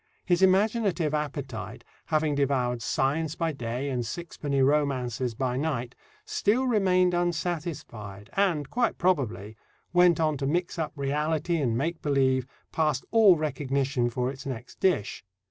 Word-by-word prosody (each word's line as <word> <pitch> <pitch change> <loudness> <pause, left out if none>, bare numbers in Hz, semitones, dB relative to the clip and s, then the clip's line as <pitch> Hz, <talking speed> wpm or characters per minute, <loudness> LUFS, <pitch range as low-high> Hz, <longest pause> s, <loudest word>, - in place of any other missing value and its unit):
His 175 0 +2
imaginative 190 -4 +2
appetite, 140 -6 -4 0.2
having 155 -1 +1
devoured 130 -4 0
science 145 +8 0
by 165 -1 -1
day 125 0 -4
and 125 -2 -1
sixpenny 140 0 -2
romances 130 -4 0
by 125 0 -1
night, 130 -5 -2 0.3
still 235 +6 +1
remained 185 -6 +3
unsatisfied, 155 - -3
and, 175 -8 +1
quite 240 -1 +1
probably, 110 - 0 0.4
went 175 -2 +5
on 155 -2 +1
to 135 0 -2
mix 175 +3 -1
up 160 - -2
reality 150 +4 0
and 120 -7 0
make 160 +5 -2
believe 130 -3 +2 0.2
past 150 -4 0
all 220 -5 +7
recognition 135 -3 -1
for 125 +2 -1
its 135 - -10
next 125 -2 -7
dish. 165 - 0
145 Hz, 135 wpm, -27 LUFS, 130-175 Hz, 0.4 s, all